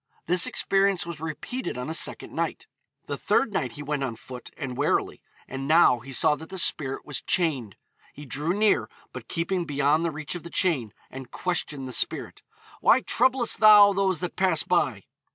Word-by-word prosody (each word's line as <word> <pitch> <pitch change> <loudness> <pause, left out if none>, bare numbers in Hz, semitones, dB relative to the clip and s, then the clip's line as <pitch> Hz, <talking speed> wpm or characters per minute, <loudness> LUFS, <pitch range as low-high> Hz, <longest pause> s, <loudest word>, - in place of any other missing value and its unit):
This 180 +1 +3
experience 195 -2 +1
was 170 -3 -7
repeated 160 - -5
on 125 - -5
a 160 - -4
second - - +1
night. - - -3 0.4
The - - -5
third 225 -6 +1
night - - -2
he 145 -2 -8
went 145 -1 -2
on 125 -4 -3
foot, 125 +2 -10
and 135 -4 -5
warily; - - -1 0.3
and 135 +1 -6
now 155 -5 +5
he 130 +4 -11
saw 155 +3 +4
that 160 +1 -11
the 190 - -7
spirit 135 -6 -1
was 145 - -3
chained. 140 - 0 0.4
He 145 - -11
drew 150 +5 -2
near, 210 +3 +1 0.2
but - - -9
keeping 175 +2 -2
beyond 150 +1 +1
the 170 - 0
reach 150 -1 -5
of 175 - -6
the 170 - -10
chain, 150 - 0 0.2
and 130 -2 -9
questioned 150 -5 -3
the 130 - -7
spirit: - - -1 0.4
'Why - - +4
troublest 255 0 +1
thou 210 -2 +8
those 190 -4 0
that 180 - -4
pass 190 -1 +2
by?' - - 0
160 Hz, 190 wpm, -25 LUFS, 135-185 Hz, 0.4 s, thou